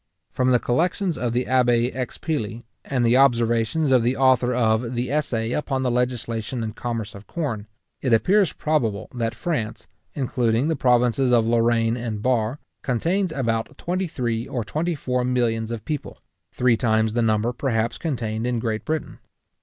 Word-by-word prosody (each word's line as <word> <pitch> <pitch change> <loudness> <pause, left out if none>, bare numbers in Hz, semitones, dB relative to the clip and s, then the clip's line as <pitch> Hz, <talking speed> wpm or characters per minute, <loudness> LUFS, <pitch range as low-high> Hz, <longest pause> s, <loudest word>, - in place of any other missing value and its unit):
From 130 0 +1
the 125 - +5
Collections 175 - 0
of 120 -2 -2
the 125 +2 0
Abbé 120 -1 +2
Expilly, 125 -3 -3 0.2
and 125 -3 0
the 120 +2 +4
observations 120 +2 +3
of 130 -2 +5
the 125 +3 0
author 130 -2 +4
of 115 0 +1
the 125 +2 -2
Essay 120 -6 0
upon 135 -1 -1
the 125 - +1
Legislation 120 -1 -2
and 110 -1 -5
Commerce 115 -3 -4
of 100 +1 -12
Corn, 120 -11 -3 0.3
it 130 - 0
appears 185 - +4
probable 115 -11 -1
that 115 -2 -2
France, 120 -11 -3 0.3
including 125 0 +1
the 160 - +1
provinces 125 0 +3
of 115 -2 +4
Lorraine 115 0 +2
and 110 -3 -4
Bar, 120 0 +1 0.2
contains 170 - 0
about 115 -6 -2
twenty 185 +2 -2
three 120 -5 -2
or 120 -3 -3
twenty 160 +9 -1
four 125 -3 -1
millions 120 -3 0
of 115 -2 -5
people; 150 -3 -4 0.3
three 125 -1 +3
times 110 -2 +1
the 120 - +1
number, 110 +1 +1
perhaps, 120 -3 -1
contained 115 -7 -2
in 125 -1 0
Great 110 -1 -2
Britain. 155 -1 -3
120 Hz, 165 wpm, -23 LUFS, 115-130 Hz, 0.3 s, the